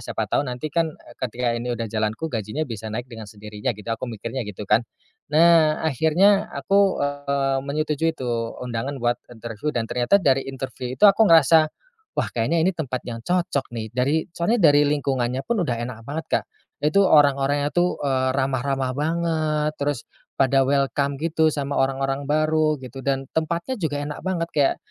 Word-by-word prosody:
siapa - - -3
tahu 140 - -1
nanti 130 +4 -5
kan 165 -2 0 0.2
ketika 125 -1 -1
ini 120 +1 -3
udah 115 - -3
jalanku 110 +8 -2
gajinya 115 +7 -2
bisa 110 -5 -6
naik 115 +3 -4
dengan 115 -4 -10
sendirinya," 105 +1 -7
gitu, 105 - -12
aku 120 +2 -4
mikirnya 115 +1 -5
gitu 105 +1 -7
kan. 105 +3 +3 0.5
Nah, 160 0 +5
akhirnya 165 +8 +3
aku, 195 -5 +2
eee, 140 -1 -1
menyetujui 155 +3 -1
tuh 120 -2 -3
undangan 125 +3 -4
buat 120 -1 0
interview 115 +3 -6
dan 115 - +1
ternyata 120 - +2
dari 135 -8 +1
interview 130 -1 -6
itu - - +3
aku 205 +1 +6
ngerasa, 160 -1 +6 0.5
"Wah, - - 0
kayaknya 155 +8 +1
ini 190 - +2
tempat 135 -7 -4
yang 115 -1 -6
cocok 175 -1 -1
nih," 110 -1 -5
dari 140 +6 +1
soalnya 170 -3 +3
dari 145 0 +4
lingkungannya 135 -3 -1
pun 230 -4 0
udah 120 - 0
enak 120 -2 -7
banget 160 +2 -4 0.2
Kak. - - -18 0.4
Nah 145 - 0
itu 200 +5 +4
orang-orangnya 145 -3 +4
tuh, 175 +1 +1
eee, 130 -2 +1
ramah-ramah 135 0 -1
banget 155 -1 0
terus 145 -3 -1 0.4
pada 135 0 +3
welcome 140 0 +1
gitu 160 +1 +1
sama 140 -2 -1
orang-orang 135 +1 -1
baru, 155 0 +2
gitu. 130 -1 -9
Dan 135 0 -1
tempatnya 170 - -2
juga 150 -4 -1
enak 150 0 -6
banget, 175 -3 -2
kayak 145 -2 +2
140 Hz, 170 wpm, -23 LUFS, 125-155 Hz, 0.5 s, aku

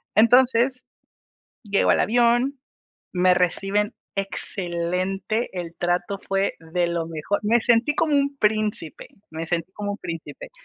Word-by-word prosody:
Entonces, 250 +2 +4 0.8
llego 205 -1 +2
al - - +3
avión, 240 +4 +2 0.5
me 180 0 +4
reciben 195 +4 0 0.2
excelente, 190 +3 -2
el 170 -1 -6
trato 175 +3 -1
fue 195 0 -1
de 170 +2 -1
lo 170 -1 -2
mejor. 165 +5 -2
Me 230 +3 +3
sentí 240 +4 +3
como 315 -2 +2
un 280 0 +1
príncipe, 210 - -1 0.2
me 160 +1 -5
sentí 170 +2 -2
como 205 0 -4
un 205 - -7
príncipe. 170 - -7
200 Hz, 130 wpm, -23 LUFS, 175-235 Hz, 0.8 s, Entonces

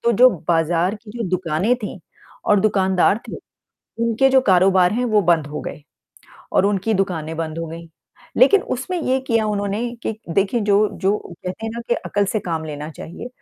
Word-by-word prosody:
तो 235 - +4
जो 250 +4 +7 0.2
बाज़ार 170 +3 +2
की 210 0 -12
जो 225 -6 -3
दुकानें 185 +5 +1
थीं 205 -4 -6 0.5
और 205 -2 +5
दुकानदार 190 -1 +2
थे। - - -5 0.7
उनके 235 +3 +3
जो 265 0 +5
कारोबार 185 -3 +4
हैं 245 +3 0
वो 215 -2 +3
बंद 165 -4 +2
हो 150 +1 -5
गए - - -7 0.7
और 195 - +3
उनकी 205 +2 0
दुकानें 165 -5 -2
बंद 165 0 -4
हो 165 - -3
गईं। 165 +1 -9 0.5
लेकिन 410 -5 +6
उसमें 350 +8 -3
ये 260 +1 +1
किया 225 -3 +2
उन्होंने 205 0 -1 0.2
कि - - -1 0.2
देखिए 200 +4 +1
जो 205 -1 +3 0.3
जो 200 +2 +3
कहते 180 +4 -7
हैं - - -3
ना 235 - -5
कि 240 - +3
अकल 205 0 -1
से 215 - 0
काम 165 -3 -3
लेना 150 0 -6
चाहिए। 170 +9 -9
195 Hz, 190 wpm, -21 LUFS, 170-225 Hz, 0.7 s, जो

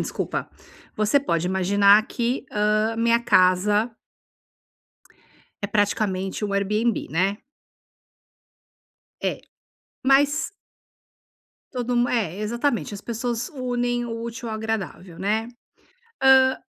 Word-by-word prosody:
desculpa, - - -3 0.5
você 215 +6 +3
pode 170 - -1
imaginar 200 +3 +4
que, 245 +1 -2
hã, 215 +2 +1
minha 235 +1 +3
casa 205 +2 +3 1.7
é - - 0
praticamente 205 -1 -1
um 200 - -3
Airbnb, 210 +4 0
né. 190 +5 +1 1.9
É. - - -1 0.6
Mas 285 +5 +3 1.2
todo 245 -2 -2
mundo 240 0 +2
é 210 -8 -1
exatamente 235 +3 -1
as 200 - -7
pessoas 235 +1 -3
unem 245 -2 -2
o 230 -1 -5
útil 235 0 -6
ao 220 - -3
agradável, 205 -5 -5
né. 220 +4 0 0.8
Hã, 260 0 +6
220 Hz, 100 wpm, -23 LUFS, 200-240 Hz, 1.9 s, Hã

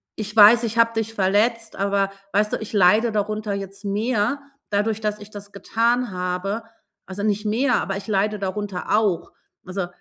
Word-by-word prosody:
ich 215 0 -6
weiß, 220 +3 +8
ich 230 0 -3
habe 230 0 +4
dich 225 0 -2
verletzt, 220 +4 +1
aber 195 0 0 0.2
weißt 210 +1 +1
du, - - +1
ich 220 0 -8
leide 210 +4 +4
darunter 210 0 -2
jetzt 195 +1 -7
mehr, 215 +5 0 0.3
dadurch, 210 +2 0
dass 210 0 -2
ich 210 +1 -12
das 205 0 -10
getan 235 +3 0
habe. 180 +4 -3 0.4
Also, 195 +2 -6
nicht 210 0 0
mehr, 245 +4 +2
aber 195 0 -3
ich 200 - -9
leide 210 0 0
darunter 200 0 -2
auch.“ 200 -6 0 0.3
Also, 185 -1 -3
210 Hz, 175 wpm, -22 LUFS, 195-220 Hz, 0.4 s, weiß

